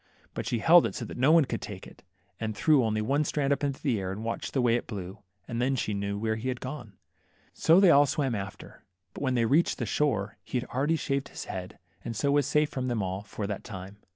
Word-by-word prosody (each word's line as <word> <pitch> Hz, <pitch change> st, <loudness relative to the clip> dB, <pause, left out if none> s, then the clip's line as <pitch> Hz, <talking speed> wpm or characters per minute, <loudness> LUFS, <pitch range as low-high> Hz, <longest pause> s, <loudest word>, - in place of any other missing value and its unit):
But -, -, -4 dB
she 120 Hz, -, 0 dB
held 165 Hz, +9 st, +6 dB
it -, -, -7 dB
so -, -, -4 dB
that -, -, -8 dB
no 130 Hz, +5 st, +4 dB
one 165 Hz, -3 st, +6 dB
could -, -, -4 dB
take 100 Hz, -4 st, -7 dB
it, -, -, -15 dB, 0.4 s
and 110 Hz, -2 st, -3 dB
threw 155 Hz, -3 st, +4 dB
one 115 Hz, +5 st, +1 dB
strand 145 Hz, -1 st, +1 dB
up 140 Hz, -, -4 dB
in 140 Hz, -, +2 dB
the 130 Hz, -5 st, -1 dB
air, 95 Hz, -1 st, -3 dB
and 105 Hz, +3 st, -6 dB
watched 115 Hz, -, -3 dB
the 135 Hz, -, +1 dB
way 120 Hz, -1 st, +4 dB
it 120 Hz, -, -3 dB
blew, 95 Hz, -2 st, -6 dB, 0.3 s
and 120 Hz, 0 st, -3 dB
then 135 Hz, +2 st, +1 dB
she 110 Hz, -4 st, -1 dB
knew 100 Hz, 0 st, -2 dB
where, 110 Hz, +1 st, -1 dB
he 115 Hz, +4 st, -5 dB
had 125 Hz, -1 st, -2 dB
gone. 130 Hz, -6 st, -7 dB, 0.6 s
So 165 Hz, +3 st, +5 dB
they 190 Hz, -3 st, +7 dB
all 145 Hz, -1 st, +6 dB
swam 140 Hz, -3 st, 0 dB
after, 100 Hz, -3 st, -7 dB, 0.3 s
but -, -, -9 dB
when 130 Hz, -2 st, 0 dB
they 115 Hz, -1 st, +2 dB
reached 150 Hz, +9 st, +2 dB
the -, -, -2 dB
shore, 105 Hz, -9 st, 0 dB
he 125 Hz, -, -2 dB
had 125 Hz, -, -7 dB
already 145 Hz, +6 st, +1 dB
shaved 140 Hz, -3 st, -2 dB
his -, -, -7 dB
head, 90 Hz, -1 st, -6 dB, 0.3 s
and 115 Hz, -1 st, -5 dB
so 140 Hz, +6 st, +1 dB
was 145 Hz, -1 st, +3 dB
safe 150 Hz, 0 st, +2 dB
from 130 Hz, -1 st, -3 dB
them 120 Hz, -5 st, -1 dB
all 95 Hz, +1 st, -3 dB
for 105 Hz, 0 st, -6 dB
that 100 Hz, -1 st, -4 dB
time. 95 Hz, 0 st, -8 dB
125 Hz, 255 wpm, -28 LUFS, 105-140 Hz, 0.6 s, they